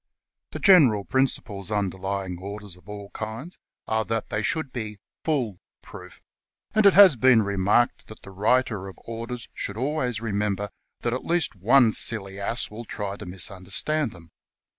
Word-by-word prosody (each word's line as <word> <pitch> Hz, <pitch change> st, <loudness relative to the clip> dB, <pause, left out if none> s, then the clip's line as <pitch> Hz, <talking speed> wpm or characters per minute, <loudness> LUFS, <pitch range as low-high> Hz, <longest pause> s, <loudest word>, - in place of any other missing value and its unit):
The -, -, -3 dB
general 135 Hz, -, +6 dB
principles 115 Hz, -7 st, -1 dB
underlying 95 Hz, -2 st, -2 dB
orders 100 Hz, 0 st, -8 dB
of 90 Hz, +2 st, -19 dB
all 100 Hz, -1 st, -8 dB
kinds 115 Hz, -, -7 dB, 0.3 s
are 110 Hz, 0 st, +1 dB
that 115 Hz, -1 st, -2 dB
they 105 Hz, -, 0 dB
should 160 Hz, +3 st, -2 dB
be 110 Hz, -4 st, -5 dB
" -, -, -67 dB
fool 125 Hz, -, -1 dB, 0.2 s
proof," -, -, -12 dB, 0.5 s
and 215 Hz, -1 st, +5 dB
it 195 Hz, -, +5 dB
has 190 Hz, -6 st, +9 dB
been 120 Hz, -2 st, +5 dB
remarked 100 Hz, +4 st, +1 dB
that 110 Hz, -, -13 dB
the 100 Hz, -, -11 dB
writer 105 Hz, 0 st, +1 dB
of 95 Hz, -, -10 dB
orders 115 Hz, +1 st, -6 dB
should 100 Hz, -, -5 dB
always 130 Hz, -3 st, -1 dB
remember 105 Hz, -2 st, -2 dB, 0.3 s
that 120 Hz, -, -1 dB
at 125 Hz, -, -3 dB
least 170 Hz, -7 st, +1 dB
one 115 Hz, +5 st, +5 dB
silly 100 Hz, -4 st, 0 dB
ass 110 Hz, +4 st, -2 dB
will 115 Hz, +3 st, -8 dB
try 100 Hz, -2 st, -4 dB
to 105 Hz, -, -9 dB
mis 90 Hz, +2 st, -1 dB
understand 105 Hz, +9 st, +1 dB
them. 85 Hz, -1 st, -15 dB
110 Hz, 165 wpm, -25 LUFS, 100-125 Hz, 0.5 s, has